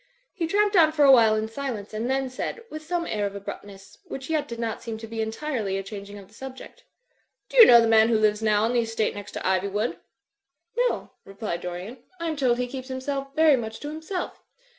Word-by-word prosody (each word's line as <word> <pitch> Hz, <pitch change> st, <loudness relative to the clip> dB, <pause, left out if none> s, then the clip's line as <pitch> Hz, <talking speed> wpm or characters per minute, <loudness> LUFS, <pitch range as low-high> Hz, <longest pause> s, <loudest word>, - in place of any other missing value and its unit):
He 335 Hz, -3 st, -2 dB
tramped 410 Hz, +3 st, +2 dB
on 320 Hz, -3 st, +6 dB
for 300 Hz, -2 st, +4 dB
a 275 Hz, -, +8 dB
while 225 Hz, -4 st, +6 dB
in 215 Hz, 0 st, -1 dB
silence 225 Hz, -4 st, -5 dB
and 225 Hz, +3 st, -2 dB
then 270 Hz, 0 st, 0 dB
said, 260 Hz, -, -5 dB
with 310 Hz, -, -6 dB
some 340 Hz, +2 st, -2 dB
air 210 Hz, -7 st, -1 dB
of 200 Hz, -, -8 dB
abruptness, 200 Hz, 0 st, -9 dB
which 270 Hz, +4 st, -7 dB
yet 300 Hz, -2 st, 0 dB
did 235 Hz, -, -6 dB
not 230 Hz, -2 st, -3 dB
seem 230 Hz, -2 st, -5 dB
to 225 Hz, -, -8 dB
be 225 Hz, 0 st, -4 dB
entirely 220 Hz, -3 st, -2 dB
a 195 Hz, -, -3 dB
changing 200 Hz, 0 st, -8 dB
of 195 Hz, -2 st, -12 dB
the 205 Hz, -, -24 dB
subject, 265 Hz, +3 st, -10 dB, 0.7 s
*'Do -, -, -5 dB
you 470 Hz, -, +12 dB
know 235 Hz, -, +9 dB
the 230 Hz, -, +3 dB
man 225 Hz, 0 st, +5 dB
who 230 Hz, -, +3 dB
lives 215 Hz, 0 st, +2 dB
now 215 Hz, -1 st, +3 dB
on 230 Hz, +2 st, +1 dB
the 245 Hz, -, +3 dB
estate 225 Hz, -1 st, -1 dB
next 205 Hz, 0 st, -9 dB
to -, -, -4 dB
Iv3rwood?" 200 Hz, +4 st, 0 dB, 0.9 s
''No/' -, -, -5 dB
replied 195 Hz, -3 st, -5 dB
Dorian, 180 Hz, +8 st, -6 dB, 0.2 s
"I 335 Hz, -, -3 dB
am 315 Hz, -, -2 dB
told 255 Hz, -4 st, +2 dB
he 250 Hz, -, 0 dB
keeps 260 Hz, +1 st, -7 dB
himself 275 Hz, +1 st, -4 dB
very 315 Hz, -2 st, +6 dB
much 225 Hz, -3 st, -5 dB
to 295 Hz, -, -5 dB
himself." 320 Hz, +4 st, -5 dB
230 Hz, 225 wpm, -25 LUFS, 210-280 Hz, 0.9 s, you